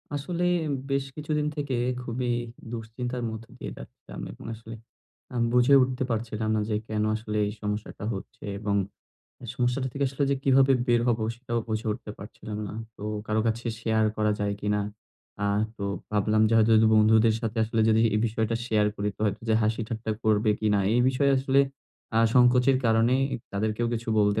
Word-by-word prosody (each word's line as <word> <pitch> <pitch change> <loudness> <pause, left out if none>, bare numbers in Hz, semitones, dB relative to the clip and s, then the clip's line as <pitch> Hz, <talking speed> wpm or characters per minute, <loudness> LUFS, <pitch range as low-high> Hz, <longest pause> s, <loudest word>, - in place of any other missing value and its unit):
আসলে 170 +5 -3 0.5
বেশ 135 0 0
কিছুদিন 150 0 -1
থেকে 145 -3 -3 0.3
খুবই 125 +1 -3 0.4
দুঃশ্চিন্তার 120 +2 -4
মধ্যে 110 +1 -8
দিয়ে - - -5
যাচ্ছিলাম - - -10
এবং - - -12
আসলে 115 +1 -9 0.6
আমি 120 -1 +1
বুঝে 125 +3 +5
উঠতে 130 +1 0
পারছিলাম 110 -1 -2
না 110 - +1
যে 105 - +1
কেন 105 -1 -1
আসলে 110 -1 -4
এই 105 - -2
সমস্যাটা 105 0 -4
হচ্ছে, 95 - -9 0.2
এবং 105 -1 -1 0.8
সমস্যাটা 125 +2 0
থেকে 140 +2 -1
আসলে 135 +2 -3
যে 140 - +2
কিভাবে 135 0 +5
বের 120 -2 +3
হবো 115 -2 +1
সেটাও 120 -1 -3
বুঝে 110 +1 -2
উঠতে 105 - -8
পারছিলাম 105 +1 -8
না। - - -7 0.2
তো - - -11 0.2
কারো 110 0 +1
কাছে 115 +1 -1
শেয়ার 110 -1 +1
করা 105 0 +2
যায় 100 0 0
কিনা। 105 0 0 0.6
আ - - +2 0.3
তো 100 - -4 0.3
ভাবলাম 105 +1 +2
যে 115 - -1
হয়তো 110 +1 +4
যদি 110 0 +5
বন্ধুদের 110 +1 +5
সাথে 115 -1 -3
আসলে 110 +1 -1
যদি 110 +1 +4
এ - - +3
বিষয়টা 110 0 -1
শেয়ার 105 -3 +2
করি 100 +1 -1
তো - - -21
হতো 100 +1 -2
যে 110 - +4
হাসি 110 +2 0
ঠাট্টা 110 -1 -4
করবে 110 0 +3
কিনা 105 -1 +2 0.2
এই 120 - +4
বিষয়ে 140 +2 +2
আসলে 135 +1 +3 0.6
আ - - +5 0.2
সংকোচের 125 +1 +5
কারণেই 115 +4 +3 0.3
তাদের 110 +2 0
কেউ 120 +1 0
কিছু 115 0 -4
বলতে 105 +1 +3
115 Hz, 180 wpm, -27 LUFS, 110-125 Hz, 0.8 s, বুঝে